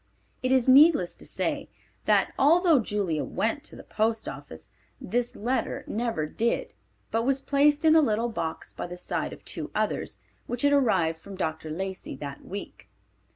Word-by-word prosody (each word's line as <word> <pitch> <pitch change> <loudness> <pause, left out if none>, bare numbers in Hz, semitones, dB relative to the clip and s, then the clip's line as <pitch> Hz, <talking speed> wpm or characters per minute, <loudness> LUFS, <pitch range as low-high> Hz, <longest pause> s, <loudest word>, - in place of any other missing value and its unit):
It 255 0 0
is 260 -2 +3
needless 270 - +6
to - - -11
say - - -2 0.4
that, - - +3
although 330 +1 +5
Julia 200 -8 -1
went 230 +7 -1
to - - -8
the - - -11
post 220 +1 -1
office, 135 - -9 0.3
this 240 +4 -2
letter 250 +5 -2
never 225 -9 -2
did 230 +9 -1 0.4
but 225 - +1
was 270 +3 +1
placed 290 +2 +2
in 315 0 +6
a 320 - +7
little 230 -3 +1
box 160 -8 -5
by - - -5
the 180 0 -8
side 180 - -3
of - - -12
two - - -4
others, - - -1 0.3
which 245 +2 -3
had 285 0 +4
arrived 185 - +2
from 195 +4 -10
Dr. 160 -3 -3
Lacey 190 0 -4
that 140 0 -8
week. 200 +1 -8
225 Hz, 170 wpm, -27 LUFS, 180-270 Hz, 0.4 s, a